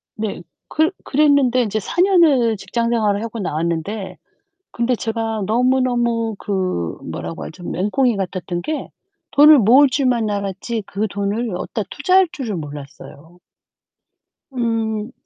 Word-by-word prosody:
네. 215 Hz, -4 st, -4 dB, 0.3 s
그 315 Hz, +3 st, +1 dB
그랬는데 280 Hz, -4 st, +3 dB
인제 215 Hz, -1 st, -2 dB
4 270 Hz, -, -5 dB
년을 310 Hz, -, +4 dB
직장 235 Hz, +3 st, -2 dB
생활을 215 Hz, -2 st, +1 dB
하고 230 Hz, 0 st, -5 dB
나왔는데 170 Hz, +4 st, -3 dB, 0.5 s
근데 240 Hz, +1 st, 0 dB
제가 225 Hz, -2 st, -3 dB
너무너무 240 Hz, -1 st, +1 dB
그 185 Hz, -, -2 dB
뭐라고 85 Hz, -1 st, -6 dB
하죠? 175 Hz, +2 st, -10 dB
맹꽁이 210 Hz, +6 st, 0 dB
같았던 180 Hz, -2 st, -3 dB
게 310 Hz, -1 st, -4 dB, 0.4 s
돈을 295 Hz, 0 st, +8 dB
모을 255 Hz, +7 st, +6 dB
줄만 250 Hz, -5 st, +1 dB
알았지 200 Hz, +3 st, -3 dB
그 210 Hz, +3 st, -2 dB
돈을 205 Hz, +2 st, -2 dB
어디다 210 Hz, +4 st, -3 dB
투자할 370 Hz, +5 st, +3 dB
줄을 255 Hz, -, -4 dB
몰랐어요. 150 Hz, +3 st, -10 dB, 1.1 s
음 225 Hz, -2 st, -2 dB
225 Hz, 265 characters per minute, -20 LUFS, 195-255 Hz, 1.1 s, 돈을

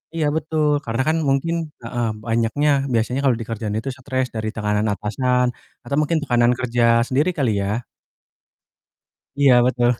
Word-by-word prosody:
iya 160 Hz, -2 st, 0 dB
betul 155 Hz, -1 st, 0 dB, 0.2 s
karena 115 Hz, +2 st, -1 dB
kan 160 Hz, +1 st, +2 dB
mungkin 140 Hz, +5 st, +1 dB, 0.3 s
heeh, 120 Hz, 0 st, -2 dB, 0.2 s
banyaknya 115 Hz, +6 st, +1 dB, 0.2 s
biasanya 120 Hz, +3 st, 0 dB
kalau 125 Hz, -4 st, +3 dB
di 115 Hz, -, -5 dB
kerjaan 110 Hz, -2 st, -3 dB
itu 135 Hz, +4 st, -5 dB
stres 130 Hz, -1 st, -2 dB
dari 110 Hz, 0 st, -2 dB
tekanan 105 Hz, 0 st, 0 dB
atasan, 125 Hz, +5 st, 0 dB, 0.4 s
atau 140 Hz, -, -3 dB
mungkin 160 Hz, +2 st, +1 dB
tekanan 120 Hz, -3 st, +3 dB
kerja 120 Hz, -1 st, 0 dB, 0.2 s
sendiri 145 Hz, +6 st, +1 dB
kali 130 Hz, -6 st, +1 dB
ya? 105 Hz, +5 st, -1 dB, 1.5 s
Iya 140 Hz, -3 st, +5 dB
betul. 125 Hz, -1 st, +2 dB
125 Hz, 150 wpm, -21 LUFS, 115-140 Hz, 1.5 s, Iya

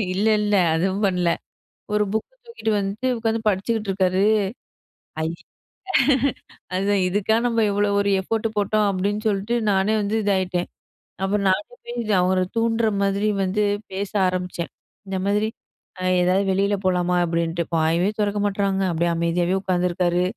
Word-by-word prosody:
இல்ல 205 Hz, -, 0 dB, 0.2 s
இல்ல 210 Hz, -1 st, +1 dB, 0.2 s
அதுவும் 190 Hz, +5 st, 0 dB
பண்ணல. 180 Hz, -2 st, +1 dB, 0.6 s
ஒரு 210 Hz, 0 st, +3 dB
புக்க 220 Hz, -, -1 dB, 0.2 s
தூக்கிட்டு 225 Hz, -, -3 dB
வந்துட்டு 200 Hz, +6 st, -2 dB
உட்காந்து 225 Hz, 0 st, -1 dB
படிச்சுக்கிட்ருக்காரு, 195 Hz, -2 st, 0 dB, 1.0 s
அய் 160 Hz, +1 st, -1 dB, 1.4 s
அதுதான் 195 Hz, +1 st, +1 dB
இதுக்கா 205 Hz, +3 st, +1 dB
நம்ம 230 Hz, -1 st, +1 dB
இவ்வளோ 205 Hz, 0 st, +1 dB
ஒரு 200 Hz, 0 st, +1 dB
எஃபோட்டு 225 Hz, +3 st, -1 dB
போட்டோம், 210 Hz, +1 st, +2 dB
அப்டின்னு 205 Hz, +3 st, -1 dB
சொல்லிட்டு 205 Hz, +4 st, 0 dB, 0.2 s
நானே 195 Hz, +3 st, +2 dB
வந்து 205 Hz, +2 st, -1 dB
இதாயிட்டேன். 185 Hz, -3 st, 0 dB, 0.5 s
அப்பறம் 200 Hz, +1 st, 0 dB
நானே 185 Hz, -, +2 dB, 0.2 s
போய் 230 Hz, -5 st, 0 dB
அவர 185 Hz, +1 st, +2 dB, 0.2 s
தூண்டுற 225 Hz, 0 st, +2 dB, 0.2 s
மாதிரி 200 Hz, +2 st, +1 dB, 0.2 s
வந்து 195 Hz, +3 st, 0 dB, 0.3 s
பேச 195 Hz, +1 st, -3 dB, 0.2 s
ஆரம்பிச்சேன். 180 Hz, -4 st, -3 dB, 0.4 s
இந்த 190 Hz, -, -2 dB
மாதிரி, 210 Hz, +2 st, +1 dB, 0.5 s
அ -, -, -4 dB, 0.2 s
ஏதாவது 185 Hz, +3 st, +2 dB
வெளியில 200 Hz, +2 st, +1 dB
போலாமா? 180 Hz, -1 st, +1 dB
அப்டின்ட்டு 170 Hz, 0 st, -1 dB
வாயே 165 Hz, +4 st, +2 dB
தெறக்க 205 Hz, 0 st, 0 dB
மாட்றாங்க 195 Hz, -1 st, 0 dB
அப்டியே 170 Hz, +1 st, +1 dB
அமைதியாவே 170 Hz, +2 st, 0 dB
உட்காந்துருக்காரு. 180 Hz, -1 st, +1 dB
195 Hz, 135 wpm, -23 LUFS, 180-210 Hz, 1.4 s, ஒரு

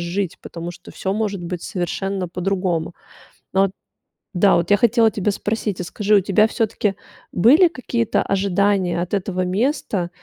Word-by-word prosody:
жить, 175 Hz, +1 st, -3 dB
потому 170 Hz, 0 st, -7 dB
что 175 Hz, -, -13 dB
всё 190 Hz, -, -3 dB
может 205 Hz, -3 st, -2 dB
быть 175 Hz, 0 st, -5 dB
совершенно 190 Hz, +1 st, -3 dB
по-другому. 180 Hz, -2 st, -2 dB, 0.6 s
Ну 190 Hz, -, +4 dB
вот 195 Hz, -, +2 dB, 0.7 s
Да, 195 Hz, +1 st, +5 dB
вот 170 Hz, +3 st, 0 dB
я 205 Hz, -, +6 dB
хотела 230 Hz, +1 st, +4 dB
тебя 205 Hz, +1 st, 0 dB
спросить, 210 Hz, -2 st, -3 dB
а -, -, -2 dB
скажи, 210 Hz, +3 st, +1 dB
у -, -, +7 dB
тебя 200 Hz, +2 st, +3 dB
всё-таки 220 Hz, -3 st, -1 dB, 0.4 s
были 290 Hz, -, +6 dB
какие-то 240 Hz, -6 st, -1 dB
ожидания 195 Hz, -2 st, +1 dB
от 180 Hz, +3 st, -5 dB
этого 185 Hz, -2 st, -1 dB, 0.2 s
места? 205 Hz, -, -1 dB
195 Hz, 160 wpm, -21 LUFS, 180-210 Hz, 0.7 s, у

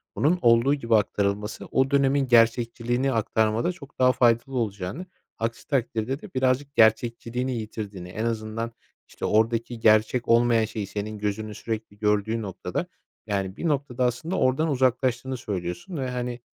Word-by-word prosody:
Bunun 170 Hz, +5 st, +2 dB
olduğu 115 Hz, +3 st, +5 dB
gibi 115 Hz, -6 st, +1 dB
aktarılması, 105 Hz, 0 st, -1 dB
o 130 Hz, +1 st, +1 dB
dönemin 140 Hz, 0 st, +3 dB
gerçekçiliğini 120 Hz, +2 st, +2 dB
aktarmada 110 Hz, -, +1 dB
çok 160 Hz, -7 st, -14 dB
daha 125 Hz, 0 st, +6 dB
faydalı 125 Hz, +1 st, +2 dB
olacağını, 105 Hz, -, -3 dB, 0.3 s
aksi 115 Hz, +1 st, -4 dB
takdirde 130 Hz, 0 st, -1 dB
de 205 Hz, -, -12 dB
birazcık 130 Hz, +2 st, 0 dB
gerçekçiliğini 115 Hz, +3 st, +2 dB
yitirdiğini, 105 Hz, -4 st, -6 dB
en 110 Hz, +5 st, -3 dB
azından, 115 Hz, 0 st, -3 dB, 0.4 s
işte, -, -, -6 dB
oradaki 115 Hz, +2 st, +1 dB
gerçek 110 Hz, +3 st, +3 dB
olmayan 115 Hz, -1 st, +4 dB
şeyi 110 Hz, -2 st, -5 dB
senin 105 Hz, +1 st, -5 dB
gözünün 105 Hz, +1 st, -3 dB
sürekli 110 Hz, -1 st, -5 dB
gördüğü 105 Hz, +2 st, +1 dB
noktada, 100 Hz, -4 st, -4 dB, 0.4 s
yani, 100 Hz, -2 st, -2 dB
bir 170 Hz, -, -2 dB
noktada 135 Hz, -4 st, 0 dB
aslında 160 Hz, +10 st, -1 dB
oradan 130 Hz, +5 st, +2 dB
uzaklaştığını 130 Hz, -1 st, +1 dB
söylüyorsun 100 Hz, -, -5 dB
ve, 130 Hz, -2 st, -2 dB
hani, 125 Hz, -1 st, -4 dB
115 Hz, 140 wpm, -25 LUFS, 110-130 Hz, 0.4 s, daha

